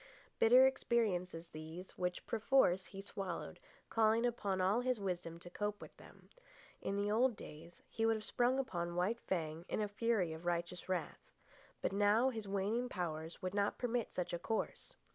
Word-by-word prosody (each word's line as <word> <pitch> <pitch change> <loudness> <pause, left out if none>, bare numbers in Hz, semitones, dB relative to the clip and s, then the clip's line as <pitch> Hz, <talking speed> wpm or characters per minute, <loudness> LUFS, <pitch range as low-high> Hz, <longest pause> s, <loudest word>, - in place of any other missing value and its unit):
Bitter 250 +3 +8
experiences 185 -10 0
these, 160 +4 -8
which, 180 0 -3
perforce, 215 -5 +3
he 195 - -8
swallowed, 195 -3 -5 0.3
calling 225 +1 +4
upon 205 -5 0
all 195 +6 +3
his 250 -2 0
wisdom 175 -4 -3
to 175 - -10
cope 210 0 -2
with - - -11
them. - - -16 0.5
In 200 - -2
the 205 +1 0
old 240 +2 +3
days 165 -1 -11
he 225 - -3
would 225 - +4
have 215 - -5
sprung 245 +4 +2
upon 175 -10 -2
White 195 +7 +1
Fang 160 -5 -2
in - - -1
a 210 - +1
fury 205 -5 +1
of 160 +1 -8
righteous 175 +1 -2
wrath. 185 -1 -3 0.5
But - - 0
now 205 +5 +4
his 220 -4 -5
waning 205 +5 0
powers 165 -3 -4
would 185 0 -2
not 205 0 +1
permit 245 -1 -1
such 180 -1 -3
a 175 - -1
course. 225 - -3
200 Hz, 175 wpm, -37 LUFS, 175-225 Hz, 0.5 s, Bitter